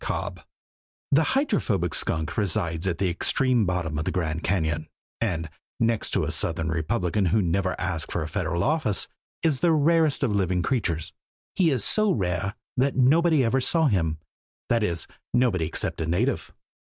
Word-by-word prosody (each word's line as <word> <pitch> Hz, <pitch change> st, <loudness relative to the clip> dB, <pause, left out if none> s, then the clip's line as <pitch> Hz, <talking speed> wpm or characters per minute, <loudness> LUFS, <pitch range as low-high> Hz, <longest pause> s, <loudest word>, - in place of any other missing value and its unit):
Cobb_ -, -, -4 dB, 0.7 s
THE 145 Hz, +3 st, +5 dB, 0.2 s
Hydrophobic 115 Hz, -, 0 dB
Skunk 80 Hz, -2 st, -1 dB
resides 85 Hz, -3 st, -1 dB
at 85 Hz, -3 st, 0 dB
the 95 Hz, +1 st, 0 dB
extreme 125 Hz, +4 st, +1 dB
bottom 85 Hz, -4 st, -1 dB
of 75 Hz, -, -3 dB
the -, -, 0 dB
Grand 80 Hz, -2 st, -2 dB
Cañon 80 Hz, -5 st, 0 dB, 0.3 s
and, 85 Hz, -8 st, -1 dB, 0.3 s
next 115 Hz, -1 st, +1 dB
to -, -, +2 dB
a -, -, -2 dB
Southern 80 Hz, 0 st, 0 dB
Republican 90 Hz, +4 st, 0 dB
who 105 Hz, +6 st, +3 dB
never 95 Hz, 0 st, 0 dB
asked 85 Hz, -3 st, -3 dB
for 85 Hz, -, -1 dB
a -, -, -4 dB
Federal 85 Hz, 0 st, -1 dB
office, 145 Hz, -8 st, 0 dB, 0.4 s
is 150 Hz, -5 st, +2 dB
the 170 Hz, -1 st, +3 dB
rarest 155 Hz, -1 st, +3 dB
of 120 Hz, -6 st, +1 dB
living 90 Hz, -3 st, +1 dB
creatures. 90 Hz, -, -1 dB, 0.4 s
He 180 Hz, -4 st, +3 dB
is 130 Hz, -8 st, 0 dB
so 215 Hz, -2 st, +3 dB
rare 95 Hz, -, -1 dB, 0.2 s
that 135 Hz, +2 st, +2 dB
nobody 155 Hz, +3 st, +4 dB
ever 125 Hz, +3 st, +2 dB
saw 160 Hz, +5 st, +2 dB
him 85 Hz, -, +1 dB, 0.5 s
that 115 Hz, -1 st, +2 dB
is, 85 Hz, -5 st, -1 dB, 0.3 s
nobody 110 Hz, -10 st, +2 dB
except 80 Hz, -, -1 dB
a 80 Hz, -, -2 dB
native. 110 Hz, +12 st, 0 dB
95 Hz, 165 wpm, -25 LUFS, 85-130 Hz, 0.7 s, THE